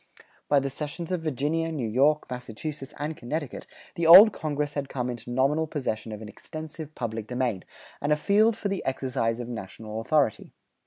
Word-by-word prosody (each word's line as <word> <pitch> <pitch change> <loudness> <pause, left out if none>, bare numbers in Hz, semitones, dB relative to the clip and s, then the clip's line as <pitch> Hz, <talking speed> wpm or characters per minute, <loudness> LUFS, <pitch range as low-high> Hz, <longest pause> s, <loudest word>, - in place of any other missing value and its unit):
By 145 - +5
the 135 0 -3
cessions 155 +5 -5
of 180 -2 -1
Virginia, 160 +2 -1
New 135 -8 -2
York, 140 +7 +3
Massachusetts, 125 +4 -6
and 150 +2 -3
Connecticut, 145 +2 -5 0.3
the 170 -1 0
Old 195 +6 +11
Congress 150 -3 -2
had 140 -2 -3
come 125 -1 -2
into 120 0 -8
nominal 140 +6 +1
possession 120 -7 -3
of 105 +1 -7
an - - -8
extensive 155 +5 -8
public 110 -3 -4
domain, 125 -5 -1 0.4
and 145 - 0
a - - +6
field 210 +7 +3
for - - -2
the 195 -1 -2
exercise 130 -3 -1
of 120 - -5
national 110 -1 -6
authority. 140 -3 +1
140 Hz, 175 wpm, -27 LUFS, 120-155 Hz, 0.4 s, Old